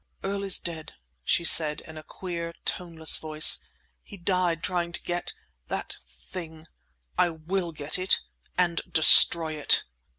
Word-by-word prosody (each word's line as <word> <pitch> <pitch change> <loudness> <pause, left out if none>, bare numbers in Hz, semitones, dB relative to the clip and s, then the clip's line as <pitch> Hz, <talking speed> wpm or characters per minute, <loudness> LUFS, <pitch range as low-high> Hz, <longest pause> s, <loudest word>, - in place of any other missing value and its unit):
"Earl 200 +1 -4
is 195 -2 +2
dead!" 165 -3 -8 0.3
she 170 - 0
said, 155 -2 +4
in 160 - -14
a 155 - -9
queer, 170 0 -8
toneless 165 -3 -1
voice. 155 -1 +2 0.4
"He 200 - -14
died 175 -2 -2
trying 175 -2 -3
to - - -6
get—that 175 - -6
thing! 160 -3 -12 0.5
I 175 - +2
will 170 +2 -5
get 150 +1 -1
it, 185 +1 +3 0.4
and 175 -2 -1
destroy 160 0 +6
it!" 150 -2 +3
170 Hz, 135 wpm, -25 LUFS, 160-180 Hz, 0.5 s, destroy